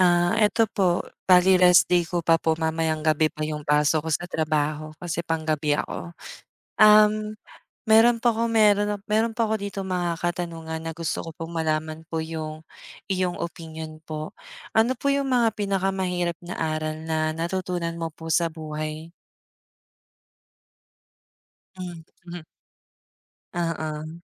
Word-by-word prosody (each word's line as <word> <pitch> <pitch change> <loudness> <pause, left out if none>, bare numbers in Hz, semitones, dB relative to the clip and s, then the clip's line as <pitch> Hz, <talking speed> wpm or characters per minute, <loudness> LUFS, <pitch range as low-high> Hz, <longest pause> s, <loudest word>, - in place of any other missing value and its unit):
Ah, 175 +2 +3
ito 225 +1 +4
po, 180 -3 +1 0.3
bale 180 0 +6
rest 180 -1 +7
day 175 -1 +3
ko 175 0 -2
pa 165 0 +4
po. 160 - +2
Mamayang 160 -1 -1
gabi 155 0 +3
pa 155 - -7
yung 150 -1 -5
pasok 150 +1 +2
ko - - -2
sa - - -2
trabaho 155 0 -1
kasi 170 -1 -2
panggabi 155 -2 0
ako. 170 +3 -5 0.7
Um, 215 0 +6 0.5
meron 230 +1 +6
po 240 - +5
ako, 230 +1 -1
meron, 205 -2 +4
ah, 205 - -7
meron 220 +2 +2
po 230 -1 +1
ako 220 - +1
ditong 195 -1 -5
mga 175 -2 0
katanungan 165 -2 -3
na 165 - -3
gusto 165 0 -3
ko - - -6
pong 165 0 -7
malaman 155 0 -2
po 165 -1 -2
yung 155 -1 -6 0.5
iyong 185 -2 0
opinyon 160 -2 -7
po. 155 0 -5 0.5
Ano 230 +3 +4
po 280 +3 -1
yung 280 0 0
mga 240 -4 +3
pinakamahirap 190 -4 -1
na 175 - -5
aral 155 -1 -2
na 155 -1 -1
natutunan 170 0 -3
mo 165 - -2
po 165 +1 -9
sa 170 +1 +3
buhay? 155 0 -6 2.7
Mhm. 175 -1 -9 1.1
Oo. 160 -1 -3
170 Hz, 140 wpm, -25 LUFS, 155-190 Hz, 2.7 s, rest